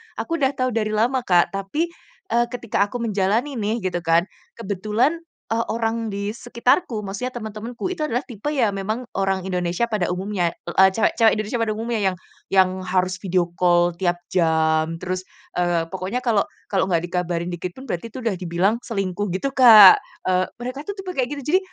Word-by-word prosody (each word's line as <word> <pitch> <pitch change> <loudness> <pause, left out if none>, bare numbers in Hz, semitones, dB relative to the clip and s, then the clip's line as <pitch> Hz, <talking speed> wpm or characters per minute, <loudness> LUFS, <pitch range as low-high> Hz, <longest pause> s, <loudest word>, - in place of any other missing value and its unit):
aku 330 -1 -3
udah 270 0 +1
tahu 255 0 0
dari 215 -1 -1
lama 245 +5 +2
Kak, 175 -2 +4
tapi, 200 - -2 0.4
eee, 240 0 +3
ketika 235 -4 -1
aku 235 +2 -5
menjalani 220 +6 0
nih, 215 +1 -2
gitu 180 -2 -1
kan, 165 0 +3 0.3
kebetulan, 215 - 0 0.3
eee, 230 +1 +1
orang 225 0 -1
di 200 0 -3
sekitarku 235 - 0
maksudnya 240 +6 -5
teman-temanku 230 - -5
itu 355 - -5
adalah 245 0 -1
tipe 225 0 -8
ya 250 -8 +1
memang 215 +5 -3 0.2
orang 195 -1 0
Indonesia 180 +3 -1
pada 190 -5 0
umumnya, 180 -2 -1
e 175 +2 +3
cewek-cewek 220 +2 +3
Indonesia 215 +2 -2
pada 220 -2 0
umumnya 225 0 -2
yang - - -7 0.3
yang 190 -1 +4 0.2
harus 185 0 0
video 180 -2 0
call 175 -1 +4
tiap 175 -1 0
jam, 160 -2 +2
terus, 185 +1 -3 0.3
eee, 175 -1 +1
pokoknya 190 +7 -3
kalau 220 -5 +2 0.2
kalau 190 -2 +1
nggak 170 -2 +1
dikabarin 175 0 -2
dikit 175 +1 -5
pun 260 - -10
berarti 220 -3 -4
itu 255 +2 -8
udah 225 -4 0
dibilang, 185 +6 0
selingkuh 195 -2 -2
gitu 275 +9 -2
Kak. 225 -7 +9 0.3
Eee, 185 0 +2 0.2
mereka 270 +4 -6
tuh 405 - -4
tipe 385 -2 -6
kayak 260 -8 -1
gitu 285 - -6
jadi, 375 - +6
205 Hz, 180 wpm, -22 LUFS, 185-235 Hz, 0.4 s, Kak